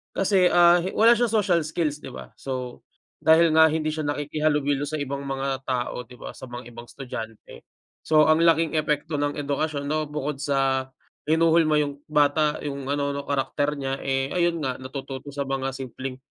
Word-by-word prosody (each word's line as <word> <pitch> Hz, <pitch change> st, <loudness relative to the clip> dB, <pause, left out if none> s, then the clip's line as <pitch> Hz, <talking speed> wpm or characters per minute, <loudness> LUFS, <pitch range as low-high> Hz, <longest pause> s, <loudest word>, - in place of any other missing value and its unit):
kasi, 190 Hz, -1 st, +3 dB
ah, 175 Hz, 0 st, +6 dB, 0.2 s
wala 230 Hz, +2 st, +6 dB
siyang 235 Hz, -1 st, 0 dB
social 180 Hz, -4 st, +2 dB
skills, 155 Hz, -2 st, -2 dB
'di -, -, -8 dB
ba? 65 Hz, -2 st, -10 dB
So, 130 Hz, -2 st, -5 dB, 0.4 s
dahil 160 Hz, +1 st, +5 dB
nga 160 Hz, 0 st, +7 dB
hindi 155 Hz, 0 st, -1 dB
siya 155 Hz, -, -3 dB
nakikihalubilo 145 Hz, -1 st, 0 dB
sa 155 Hz, +2 st, -3 dB
ibang 140 Hz, 0 st, -4 dB
mga 135 Hz, 0 st, -3 dB
tao, 125 Hz, -1 st, -2 dB
'di 125 Hz, -, -14 dB
ba, -, -, -8 dB
sa -, -, -10 dB
mga 120 Hz, 0 st, -8 dB
ibang 120 Hz, +1 st, -10 dB
estudyante. 115 Hz, -5 st, -8 dB, 0.4 s
So, 155 Hz, -1 st, +5 dB
ang 155 Hz, +1 st, +4 dB
laking 165 Hz, -1 st, +3 dB
epekto 150 Hz, +1 st, -1 dB
ng 145 Hz, 0 st, -1 dB
edukasyon 145 Hz, 0 st, -2 dB
'no, 155 Hz, 0 st, 0 dB
bukod 150 Hz, -1 st, -3 dB
sa 135 Hz, -2 st, 0 dB, 0.4 s
hinuhulma 160 Hz, -1 st, +4 dB
'yong 145 Hz, -1 st, -4 dB
bata, 150 Hz, 0 st, +2 dB
'yong 140 Hz, -2 st, -5 dB
ano 140 Hz, 0 st, -1 dB
'no, 140 Hz, -, -3 dB
karakter 145 Hz, +1 st, -1 dB
niya, 135 Hz, -1 st, -3 dB
eh, 135 Hz, 0 st, -1 dB
ayun 170 Hz, -1 st, +1 dB
nga, 130 Hz, -3 st, -2 dB
natututo 135 Hz, +1 st, -7 dB
sa 140 Hz, -1 st, -3 dB
mga 135 Hz, 0 st, -2 dB
simpleng 130 Hz, 0 st, -6 dB
145 Hz, 175 wpm, -24 LUFS, 135-155 Hz, 0.4 s, nga